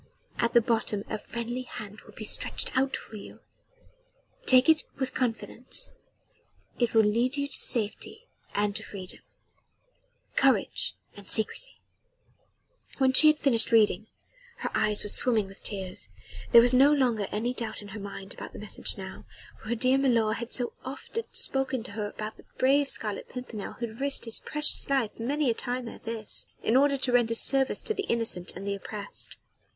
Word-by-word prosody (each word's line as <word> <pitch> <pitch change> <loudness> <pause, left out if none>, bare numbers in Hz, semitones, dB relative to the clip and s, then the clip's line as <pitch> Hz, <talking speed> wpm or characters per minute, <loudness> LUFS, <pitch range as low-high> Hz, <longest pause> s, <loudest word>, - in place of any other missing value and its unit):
At 235 - +1
the 235 - +7
bottom 220 -3 -1
a - - -2
friendly 235 +3 -5
hand 215 -4 -9
will - - -17
be - - -7
stretched - - +1
out 265 +1 +1
for 220 - -11
you. 200 - -12 1.1
Take 255 0 +6
it 320 -1 +4
with 265 -1 -3
confidence 230 -1 -3 0.9
it 240 -2 0
will 220 - +6
lead 235 +6 +1
you 280 0 -1
to 280 - -9
safety 235 - -1 0.3
and 205 -1 0
to 220 - -2
freedom. 190 -4 -8 1.2
Courage - - +1 0.2
and 205 -1 -12
secrecy." 220 - +1 1.2
When 265 -1 +3
she 310 - +10
had 305 0 +5
finished 240 -6 +4
reading, 215 -2 +3 0.6
her - - -2
eyes 210 -1 +1
were 210 - -3
swimming 220 -4 +2
in - - -11
tears. 195 -2 -4 0.4
There 235 - +9
was 245 +1 +4
no 270 +3 +6
longer 245 -8 +1
any 230 +4 -2
doubt 225 -3 -4
in 205 - -11
her 205 +2 -8
mind 200 -1 -8
about - - -9
the - - -9
message 210 0 -2
now, 190 -1 -9 0.4
for 220 - -10
her 235 - 0
dear 255 +3 +2
milor 230 -5 +2
had 235 +1 -6
so 245 -2 +5
often 280 - -6
spoken 265 -3 +1
to 245 - -7
her 205 0 -4
about 215 +1 -7
the - - -17
brave 275 +2 +3
Scarlet 210 -2 0
Pimpernel 245 -5 -7
who 240 - -5
had 230 +3 -10
risked 280 -2 +1
his 230 - +1
precious 300 -2 +1
life 265 -7 0
many 275 +3 0
a - - 0
time 250 +1 -3
ere - - -9
this, 225 -2 -2 0.2
in 225 - +1
order 280 +1 +4
to 260 -1 0
render 235 -2 +2
service 270 +3 +4
to 440 - -1
the 400 -1 -4
innocent 225 -6 0
and 190 +3 -8
the 200 - -1
oppressed. 200 +1 -3
235 Hz, 180 wpm, -27 LUFS, 215-260 Hz, 1.2 s, she